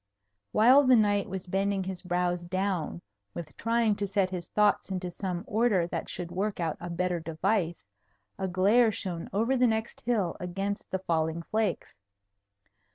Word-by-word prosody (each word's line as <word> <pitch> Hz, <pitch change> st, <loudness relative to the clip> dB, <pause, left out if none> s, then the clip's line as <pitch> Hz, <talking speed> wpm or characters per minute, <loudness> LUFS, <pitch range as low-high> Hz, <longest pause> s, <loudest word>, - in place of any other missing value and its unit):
While 255 Hz, -, +6 dB
the 255 Hz, -1 st, +7 dB
knight 205 Hz, -2 st, +2 dB
was 190 Hz, 0 st, -5 dB
bending 195 Hz, +1 st, 0 dB
his 185 Hz, -1 st, -5 dB
brows 175 Hz, -1 st, -1 dB
down 185 Hz, -, -2 dB, 0.3 s
with 155 Hz, -5 st, -7 dB
trying 230 Hz, -2 st, +1 dB
to 205 Hz, -, -2 dB
set 195 Hz, -1 st, +1 dB
his 175 Hz, -2 st, -5 dB
thoughts 210 Hz, -1 st, +2 dB
into 185 Hz, -2 st, -3 dB
some 180 Hz, -1 st, -4 dB
order 210 Hz, -5 st, +2 dB
that 175 Hz, -, -4 dB
should 175 Hz, -1 st, -5 dB
work 195 Hz, +3 st, -2 dB
out 165 Hz, -3 st, -1 dB
a 175 Hz, -, -6 dB
better 175 Hz, 0 st, -1 dB
device, 165 Hz, -, -1 dB, 0.5 s
a 190 Hz, -, -1 dB
glare 205 Hz, +6 st, +4 dB
shone 175 Hz, -5 st, -5 dB
over 230 Hz, +7 st, +1 dB
the 250 Hz, -1 st, +4 dB
next 220 Hz, 0 st, -2 dB
hill 215 Hz, -8 st, 0 dB
against 195 Hz, +3 st, -3 dB
the 190 Hz, -, -1 dB
falling 165 Hz, -2 st, -1 dB
flakes. 215 Hz, -, -2 dB
190 Hz, 160 wpm, -29 LUFS, 175-210 Hz, 0.5 s, the